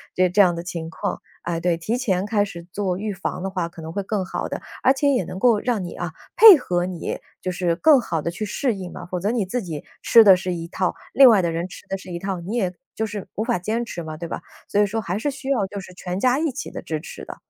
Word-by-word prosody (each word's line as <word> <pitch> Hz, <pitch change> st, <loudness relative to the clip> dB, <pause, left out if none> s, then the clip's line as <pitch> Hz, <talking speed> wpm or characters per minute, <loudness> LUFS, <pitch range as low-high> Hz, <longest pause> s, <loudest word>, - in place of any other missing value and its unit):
就 185 Hz, 0 st, +4 dB
这 200 Hz, +3 st, +5 dB
样 175 Hz, -3 st, +4 dB
的 170 Hz, -, -5 dB
情 170 Hz, -2 st, -5 dB
况。 195 Hz, +4 st, -4 dB, 0.2 s
哎， 170 Hz, -1 st, -2 dB
对， 175 Hz, 0 st, +1 dB
提 215 Hz, +9 st, -2 dB
前 195 Hz, -7 st, 0 dB
开 210 Hz, -1 st, +1 dB
始 170 Hz, -4 st, -9 dB
做 190 Hz, -3 st, -1 dB
预 210 Hz, +1 st, -3 dB
防 185 Hz, -1 st, -4 dB
的 195 Hz, -, -1 dB
话 180 Hz, -3 st, -2 dB
可 170 Hz, -1 st, -12 dB
能 160 Hz, 0 st, -6 dB
会 200 Hz, -, -2 dB
更 195 Hz, 0 st, -2 dB
好 185 Hz, -, -3 dB
的， -, -, -5 dB, 0.2 s
而 260 Hz, -, +5 dB
且 280 Hz, +1 st, +1 dB
也 250 Hz, -10 st, +2 dB
能 185 Hz, +2 st, -7 dB
够 230 Hz, -1 st, +4 dB
让 230 Hz, -6 st, -1 dB
你 175 Hz, -, -6 dB
啊 175 Hz, -2 st, -5 dB, 0.2 s
配 425 Hz, -6 st, +11 dB
合 175 Hz, -7 st, -1 dB
你， 180 Hz, -3 st, -4 dB, 0.2 s
就 185 Hz, -, -2 dB
是 175 Hz, -1 st, 0 dB
更 290 Hz, -, +6 dB
好 165 Hz, -9 st, -2 dB
地 170 Hz, -, -2 dB
去 215 Hz, +5 st, -4 dB
适 240 Hz, +4 st, 0 dB
应 185 Hz, -2 st, -7 dB
啊， -, -, -8 dB
否 180 Hz, -, -1 dB
则 200 Hz, +4 st, 0 dB
你 225 Hz, -5 st, 0 dB
自 240 Hz, +6 st, -2 dB
己 160 Hz, -6 st, -6 dB, 0.2 s
吃 230 Hz, -1 st, +7 dB
的 190 Hz, -3 st, +8 dB
是 180 Hz, 0 st, -3 dB
一 165 Hz, -1 st, -5 dB
套， 185 Hz, -, -1 dB, 0.2 s
另 270 Hz, -1 st, +9 dB
外 215 Hz, -6 st, +6 dB
的 170 Hz, -, 0 dB
人 170 Hz, +2 st, -2 dB
吃 -, -, -12 dB
的 195 Hz, -, -1 dB
是 185 Hz, -1 st, -10 dB
一 170 Hz, -, -2 dB
套， 190 Hz, 0 st, -3 dB
你 190 Hz, +7 st, -5 dB
也 185 Hz, -6 st, 0 dB, 0.2 s
就 220 Hz, -, -1 dB
是 205 Hz, -2 st, -6 dB
无 215 Hz, -, -1 dB
法 180 Hz, -, 0 dB
坚 220 Hz, +6 st, -1 dB
持 175 Hz, -7 st, -6 dB
嘛， 155 Hz, -1 st, -6 dB
对 170 Hz, +1 st, -6 dB
吧？ -, -, -4 dB, 0.3 s
所 205 Hz, -, +1 dB
以 205 Hz, -, +5 dB
说 220 Hz, +3 st, -2 dB
还 195 Hz, 0 st, -3 dB
是 290 Hz, -, 0 dB
需 275 Hz, 0 st, -7 dB
要 215 Hz, -8 st, +1 dB
就 200 Hz, 0 st, -6 dB
是 185 Hz, -, -12 dB
全 180 Hz, 0 st, -5 dB
家 255 Hz, +5 st, +2 dB
一 320 Hz, -1 st, +1 dB
起 270 Hz, +2 st, -6 dB
的 -, -, -6 dB
支 160 Hz, -4 st, -4 dB
持 -, -, -9 dB
的。 -, -, -8 dB
190 Hz, 310 characters per minute, -23 LUFS, 175-220 Hz, 0.3 s, 配